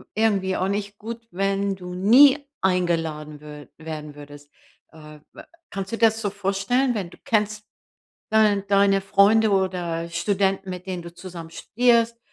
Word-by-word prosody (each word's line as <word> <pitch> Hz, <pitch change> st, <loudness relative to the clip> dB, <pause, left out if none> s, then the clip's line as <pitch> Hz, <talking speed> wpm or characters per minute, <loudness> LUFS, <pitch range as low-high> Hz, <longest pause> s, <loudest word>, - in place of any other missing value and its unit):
irgendwie 200 Hz, -4 st, +1 dB
auch 185 Hz, -, -1 dB
nicht 200 Hz, 0 st, -4 dB
gut, 230 Hz, +1 st, -8 dB
wenn 195 Hz, +1 st, -1 dB
du 180 Hz, -1 st, -9 dB
nie 260 Hz, +10 st, +6 dB, 0.2 s
eingeladen 165 Hz, -5 st, -1 dB
wür 150 Hz, -1 st, -11 dB
werden 155 Hz, -2 st, -8 dB
würdest. 145 Hz, 0 st, -13 dB, 0.4 s
Äh, 150 Hz, -1 st, -13 dB
wa -, -, -12 dB, 0.3 s
kannst 195 Hz, -1 st, -5 dB
du -, -, -1 dB
dir 230 Hz, -, +6 dB
das 220 Hz, 0 st, -2 dB
so 205 Hz, -, -1 dB
vorstellen, 200 Hz, +6 st, 0 dB
wenn 185 Hz, -5 st, -4 dB
du -, -, -15 dB
kennst 210 Hz, -1 st, 0 dB, 0.7 s
dein 210 Hz, -2 st, +3 dB
deine 200 Hz, 0 st, +3 dB
Freunde 210 Hz, +3 st, +4 dB
oder 180 Hz, -4 st, -1 dB
Studenten, 195 Hz, +2 st, -1 dB
mit 180 Hz, 0 st, -7 dB
denen 180 Hz, -2 st, -4 dB
du 170 Hz, 0 st, -10 dB
zusammen 175 Hz, -2 st, -9 dB
studierst, 235 Hz, +4 st, +1 dB
195 Hz, 155 wpm, -23 LUFS, 170-210 Hz, 0.7 s, nie